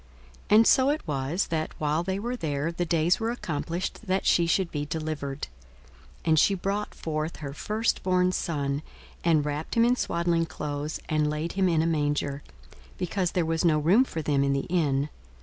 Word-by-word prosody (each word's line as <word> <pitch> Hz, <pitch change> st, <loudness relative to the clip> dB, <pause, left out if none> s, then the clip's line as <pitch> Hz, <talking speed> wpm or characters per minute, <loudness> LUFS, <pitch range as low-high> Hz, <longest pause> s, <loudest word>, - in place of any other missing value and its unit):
42:002:006 210 Hz, -, +6 dB
And 225 Hz, -, +7 dB
so 265 Hz, +1 st, +5 dB
it 295 Hz, -, -1 dB
was, 145 Hz, +5 st, -1 dB
that, 160 Hz, -2 st, -3 dB
while 150 Hz, +1 st, +1 dB
they 190 Hz, +2 st, -2 dB
were 240 Hz, +5 st, -3 dB
there, 155 Hz, -, -2 dB
the 175 Hz, +1 st, -2 dB
days 170 Hz, +3 st, +2 dB
were 225 Hz, 0 st, -1 dB
accomplished 175 Hz, -1 st, -4 dB
that 190 Hz, +1 st, 0 dB
she 170 Hz, -1 st, +4 dB
should 175 Hz, +1 st, +1 dB
be 145 Hz, -1 st, -2 dB
delivered. 150 Hz, -2 st, -4 dB
42:002:007 -, -, -4 dB, 0.8 s
And 160 Hz, -2 st, +4 dB
she 200 Hz, -, +4 dB
brought 200 Hz, +3 st, -3 dB
forth 155 Hz, 0 st, -3 dB
her 140 Hz, -2 st, -6 dB
firstborn 185 Hz, -2 st, +1 dB
son, 145 Hz, -5 st, -1 dB, 0.4 s
and 160 Hz, -3 st, +3 dB
wrapped 150 Hz, +1 st, -3 dB
him 230 Hz, -, +6 dB
in 245 Hz, +1 st, +4 dB
swaddling 170 Hz, -6 st, 0 dB
clothes, 150 Hz, -1 st, -4 dB
and 155 Hz, -1 st, +1 dB
laid 155 Hz, +3 st, -2 dB
him 190 Hz, -1 st, +2 dB
in 160 Hz, -2 st, +2 dB
a -, -, 0 dB
manger; 145 Hz, -3 st, 0 dB, 0.6 s
because 180 Hz, 0 st, -1 dB
there 175 Hz, -2 st, +1 dB
was 165 Hz, +1 st, 0 dB
no 160 Hz, -3 st, +4 dB
room 175 Hz, -, +5 dB
for 165 Hz, -11 st, -5 dB
them 140 Hz, -2 st, +2 dB
in 140 Hz, 0 st, +2 dB
the 140 Hz, -, +1 dB
inn. 145 Hz, -5 st, +1 dB
165 Hz, 190 wpm, -27 LUFS, 150-185 Hz, 0.8 s, And